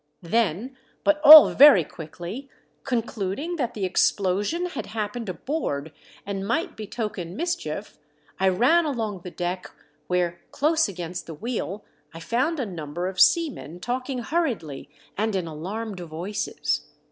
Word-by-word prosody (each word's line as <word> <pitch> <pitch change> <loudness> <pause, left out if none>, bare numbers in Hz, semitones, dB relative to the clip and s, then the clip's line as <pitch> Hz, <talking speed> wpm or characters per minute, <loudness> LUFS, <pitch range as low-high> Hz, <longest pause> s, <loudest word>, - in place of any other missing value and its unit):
Then, 225 - 0 0.3
but 300 0 +2
all 305 +1 +11
very 275 - +8
quickly, 175 - -8 0.3
concluding 240 - -3
that 250 -6 -2
the 200 -3 -2
explosion 200 - +1
had 360 - -5
happened 215 +1 -4
aboard 165 - -3 0.3
and 195 -1 -4
might 240 +10 -1
betoken 210 -5 -5
mischief, 210 - -4 0.4
I 190 0 +4
ran 260 - +3
along 225 -9 -3
the 180 - -8
deck 180 +1 -4 0.4
where, 175 -1 -1
close 320 +1 +2
against 175 -2 -6
the 165 - -7
vi^heel, 210 0 -4 0.3
I - - -7
found 260 - -1
a 255 - -1
number 175 -3 -5
of 190 0 -1
seamen 285 - +2
talking 255 +6 -3
hurriedly 230 - -2 0.3
and 220 -1 0
in 185 -3 -1
alarmed 190 +6 -5
voices. 175 +6 -3
205 Hz, 135 wpm, -25 LUFS, 175-260 Hz, 0.4 s, all